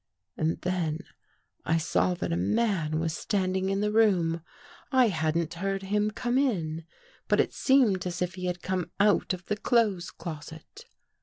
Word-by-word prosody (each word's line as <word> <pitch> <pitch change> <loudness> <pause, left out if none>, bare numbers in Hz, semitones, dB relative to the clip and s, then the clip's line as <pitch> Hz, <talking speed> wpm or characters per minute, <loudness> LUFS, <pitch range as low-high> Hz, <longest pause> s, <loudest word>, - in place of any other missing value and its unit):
And 160 +1 -1
then 170 -4 -1 0.6
I 165 - +2
saw 180 +2 +1
that 170 - -3
a - - +1
man 155 - +1
was 160 0 -1
standing 190 -1 -1
in 195 +1 0
the 210 0 +1
room. 180 -7 +3 0.5
I 255 -3 +5
hadn't 160 -1 0
heard 195 +2 -2
him 210 +2 +1
come 240 +4 0
in, 165 - -1 0.4
but - - +2
it - - +2
seemed 230 -10 +3
as 180 0 -4
if 180 0 -1
he 180 0 -6
had 180 -1 -3
come 185 -2 -2
out 205 0 +3
of 185 -1 -4
the 210 - -2
clothes 210 -6 +1
closet. 160 - -9
185 Hz, 165 wpm, -28 LUFS, 165-210 Hz, 0.6 s, I